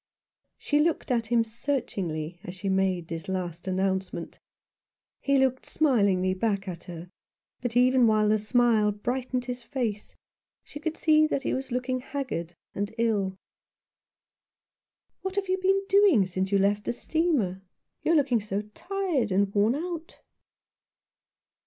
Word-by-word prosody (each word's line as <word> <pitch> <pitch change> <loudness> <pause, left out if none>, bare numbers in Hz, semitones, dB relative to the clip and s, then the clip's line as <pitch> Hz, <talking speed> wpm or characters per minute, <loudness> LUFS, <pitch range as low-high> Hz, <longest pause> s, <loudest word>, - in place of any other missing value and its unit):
She 295 - +1
looked 310 -3 +1
at 230 -2 +1
him 235 0 +3
searchingly 195 - -3
as 180 - -7
she 190 +1 -3
made 190 -3 +1
this 165 -1 -6
last 180 -1 -4
announcement. 190 -2 -2 0.8
He 280 0 +2
looked 260 -1 +1
smilingly 200 -11 +2
back 200 0 -1
at 175 -2 -6
her; 175 0 -9 0.5
but 245 -1 -1
even 250 -1 +5
while 215 -1 +3
the 215 +1 +3
smile 220 -1 +3
brightened 250 +4 -2
his 250 0 -5
face 230 -5 -4 0.5
she 295 - -10
could 320 +1 -3
see 310 -1 +4
that 280 -3 -1
he - - -1
was 265 0 -4
looking 250 +1 -1
haggard 250 - -4 0.2
and 205 +3 -3
ill. 205 -5 0 1.8
"What 380 0 -4
have 400 -1 -1
you 375 +1 +1
been 390 +1 +2
doing 390 - +5
since 185 +1 -2
you 200 - +4
left 205 +1 +1
the - - -1
steamer? 250 - 0 0.4
You 330 - +2
are - - +5
looking 265 -7 +3
so 205 0 -3
tired 355 - -1
and 195 +1 +2
worn 215 +4 +3
out." 335 +1 -5
230 Hz, 145 wpm, -27 LUFS, 190-275 Hz, 1.8 s, even